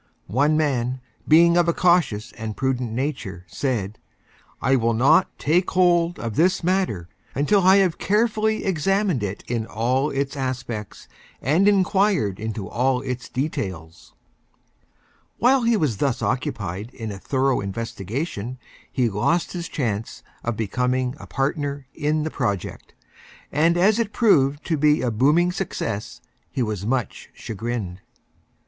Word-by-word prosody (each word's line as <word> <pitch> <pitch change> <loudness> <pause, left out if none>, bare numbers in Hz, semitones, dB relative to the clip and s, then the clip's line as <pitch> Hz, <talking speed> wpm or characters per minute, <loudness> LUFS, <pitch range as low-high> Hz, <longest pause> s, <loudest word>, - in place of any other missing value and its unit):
One 145 +9 +2
Man, 130 -4 0 0.3
being 170 +2 +6
of 175 -1 +3
a 170 - +3
Cautious 160 - +2
and 110 -1 -6
Prudent 130 -3 -1
Nature, 115 - -3
said: 110 - -3 0.6
"I 130 +2 +2
will 115 -2 +1
not 155 +10 +4
Take 175 +5 +1
Hold 175 -2 +3
of 115 -3 -4
this 180 +3 +2
Matter 180 - 0 0.3
until 170 +9 +3
I 190 +1 +6
have 190 -4 +2
Carefully 220 +1 +1
Examined 195 - +1
it 100 -1 -4
in 115 -2 -2
All 130 +6 0
its 140 0 -2
Aspects 125 -6 -5 0.3
and 160 - +2
Inquired 190 - +2
into 110 -2 -4
All 125 +1 +1
its 125 -2 -5
Details." 95 - -5 1.2
While 260 +2 +4
he 230 -1 +3
was 145 - 0
thus 130 +1 0
Occupied 100 -4 -2
in 110 -3 -5
a 100 - -7
thorough 135 +3 +1
Investigation 115 - -4 0.3
he 125 -3 +1
Lost 115 - 0
his 175 -2 -5
Chance 110 -6 -3 0.2
of 120 -2 -2
becoming 125 +4 0
a - - -10
Partner 140 0 -2
in 150 +1 0
the 155 - -3
Project, 100 -8 -3 0.6
and 165 +4 +3
as 205 +5 +4
It 220 -2 -1
proved 145 - +3
to 160 - 0
be 150 +2 +3
a 125 - +1
Booming 150 +10 +3
Success, 110 - -4 0.3
he 130 - -1
was 105 -3 -3
Much 125 -3 -2
Chagrined. 110 -4 -5
135 Hz, 140 wpm, -23 LUFS, 115-170 Hz, 1.2 s, being